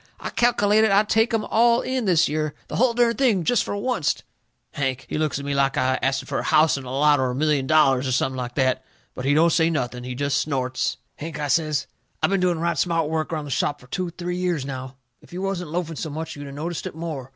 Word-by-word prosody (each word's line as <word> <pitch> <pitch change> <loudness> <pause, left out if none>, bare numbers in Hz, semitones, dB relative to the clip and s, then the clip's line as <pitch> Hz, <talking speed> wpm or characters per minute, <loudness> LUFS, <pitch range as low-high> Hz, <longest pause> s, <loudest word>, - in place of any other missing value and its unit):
I - - -5
calkelated 220 -2 +3
I'd 205 +2 +3
take 225 +2 +3
'em 225 -2 0
all 235 +1 +3
in 255 -2 -2
this 170 -4 +4
year 155 0 -2
the - - -3
hull 235 0 +3
dern 235 -1 +3
thing, 230 -10 +2
jest 245 +4 +2
fur - - -4
oncet." 205 - -1 0.5
Hank, 135 -2 -2
he - - -3
looks 155 -3 0
at 140 - -6
me 140 - -1
like 135 -1 +1
I'd 130 0 +1
asted 135 0 0
fur - - -2
a - - -3
house 155 0 +4
'n' 135 -1 -6
lot, 145 +3 +3
or 130 -1 +1
a 125 - -3
million 145 -1 +1
dollars, 135 -4 +4
or - - -1
something 130 +1 0
like 125 -1 -5
that. 130 -2 +1 0.3
But 125 - -6
he 145 +1 +3
don't 165 +2 +4
say 165 -1 +3
nothing. 125 -6 -2
He 125 0 -5
jest 140 +1 0
snorts. 130 -3 -1 0.2
"Hank," 160 0 -6
I 145 -1 -2
says, 150 -3 +1 0.3
"I - - +2
been 195 0 +1
doing 180 -2 +2
right 170 +1 -1
smart 165 -3 +1
work 160 +1 -2
around 155 -2 -3
the 145 - -7
shop 145 +2 0
fur - - -16
two, 180 +7 -3
three 175 +1 -4
years 175 -6 -1
now. 130 -1 -6 0.3
If - - -18
you 185 +2 -4
wasn't 185 -4 -3
loafing 165 -1 -3
so 160 - -4
much 160 +2 -5
you'd 145 -1 -8
a - - -8
noticed 160 +4 -4
it - - -8
more. 155 -6 -5
155 Hz, 250 wpm, -23 LUFS, 135-180 Hz, 0.5 s, this